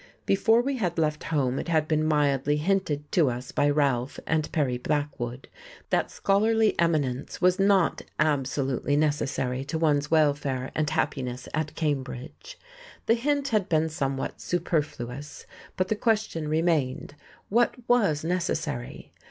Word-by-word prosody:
Before 225 +4 +3
we 275 0 -1
had 180 -7 -1
left 155 -2 0
home 135 -5 0
it - - -5
had 160 -2 +1
been 155 -1 +1
mildly 145 -2 +2
hinted 150 -4 -1
to 160 -7 +3
us 125 +1 -5
by 145 - +2
Ralph 140 -3 0
and 155 -2 0
Perry 130 -6 0
Blackwood 135 -3 -3 0.4
that - - +1
scholarly 220 +2 +2
eminence 150 -7 0
was 180 +1 +3
not 195 -2 +3 0.2
absolutely 140 -2 0
necessary 140 -3 0
to 150 +3 -3
one's 150 -2 +1
welfare 145 -4 +1
and 155 -2 0
happiness 130 -5 -2
at 155 0 -2
Cambridge. 145 - -4 0.5
The 225 - +4
hint 280 +4 0
had 210 -4 0
been 160 0 +2
somewhat 135 -4 -3
superfluous; 150 -5 -3 0.3
but 185 - +1
the 215 - +1
question 210 -8 0
remained, 155 -4 0 0.4
what 235 +3 +3
was 200 -12 +2
necessary? 165 -7 -3
155 Hz, 135 wpm, -26 LUFS, 140-180 Hz, 0.5 s, The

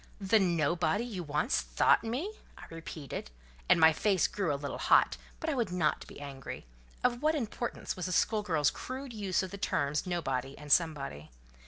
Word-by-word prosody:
"The 205 +2 +3
nobody 170 +2 +1
you 210 -7 -5
once 155 - 0
thought - - +3
me!" 265 - -3 0.2
I - - -11
repeated, 160 - -7 0.4
and - - +6
my 160 0 +7
face 195 +2 +2
grew 195 -6 -1
a - - +1
little 140 0 -5
hot; - - +4 0.2
but 320 - -4
I 315 - +1
would 235 -8 -1
not 170 -4 0
be - - -11
angry: 135 - -7 0.4
of 245 0 +2
what 310 +1 +3
importance 240 -3 -3
was 180 0 -3
a - - -3
school 215 +3 +2
girl's 160 -8 +2
crude 260 0 -6
use 200 -3 0
of 185 - -5
the 200 - -7
terms 145 -4 0
nobody 135 -6 -2
and 150 -1 -8
somebody? 140 - +1
180 Hz, 185 wpm, -31 LUFS, 150-220 Hz, 0.4 s, my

